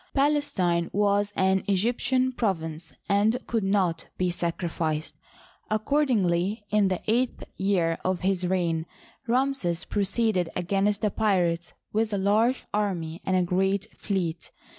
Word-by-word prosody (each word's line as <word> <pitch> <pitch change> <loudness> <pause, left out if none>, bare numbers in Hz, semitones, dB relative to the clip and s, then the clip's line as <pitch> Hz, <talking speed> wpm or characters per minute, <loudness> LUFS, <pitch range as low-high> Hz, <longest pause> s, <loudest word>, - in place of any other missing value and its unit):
Palestine 270 - +1
was 205 0 +2
an 190 0 +2
Egyptian 245 +6 +1
province, 165 -9 -2 0.2
and 205 +4 +3
could 225 -3 -1
not 190 -4 +1
be 180 -1 +1
sacrificed. 165 -2 -2 0.6
Accordingly, 215 - +1
in 210 -2 +4
the 185 -1 -2
eighth 240 +3 0
year 180 -4 +1
of 185 -1 0
his 185 -1 +1
reign, 170 -3 0 0.4
Ramses 245 -9 0
proceeded 200 -3 0
against 200 +3 0
the 210 - +1
pirates 175 -6 +1 0.2
with 220 0 +1
a - - +1
large 215 +6 +2
army 180 -6 -2
and 185 -1 +3
a 180 - +3
great 190 +4 0
fleet. 175 -5 -3
195 Hz, 125 wpm, -26 LUFS, 175-215 Hz, 0.6 s, in